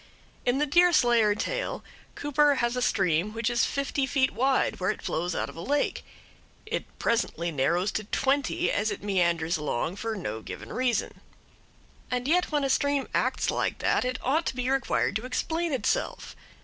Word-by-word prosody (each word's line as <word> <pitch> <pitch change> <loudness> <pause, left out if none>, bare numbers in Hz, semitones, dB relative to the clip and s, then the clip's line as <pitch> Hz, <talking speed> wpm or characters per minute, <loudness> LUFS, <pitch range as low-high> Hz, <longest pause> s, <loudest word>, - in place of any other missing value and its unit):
In 245 +2 +3
the 295 - +2
Deerslayer 250 -10 +4
tale - - -3 0.3
Cooper 290 0 +3
has 240 -1 0
a 250 - -1
stream 190 -3 +1
which 230 +1 0
is 240 - +2
fifty 280 -1 -1
feet 265 0 +2
wide 265 +1 +1
where 185 - 0
it - - -3
flows 175 +1 -2
out - - -1
of - - -11
a 165 - -7
lake; 285 +9 0 0.6
it - - -5
presently 175 -7 0
narrows 170 +8 +1
to 215 - -3
twenty 270 +5 0
as 210 +2 0
it - - -5
meanders 170 -4 +1
along 150 +4 -2
for 225 +1 -3
no 110 - -4
given - - -8
reason; 250 -2 -1 0.9
and 250 +1 -2
yet 355 +3 +2
when 295 -2 +1
a 275 - 0
stream 285 0 +1
acts - - +1
like - - -1
that - - +1
it 255 0 -2
ought 305 +6 +1
to - - -2
be 250 +1 -1
required 270 -6 +1
to 220 - -8
explain 325 +6 -1
itself. 285 - -1
245 Hz, 175 wpm, -27 LUFS, 195-280 Hz, 0.9 s, Deerslayer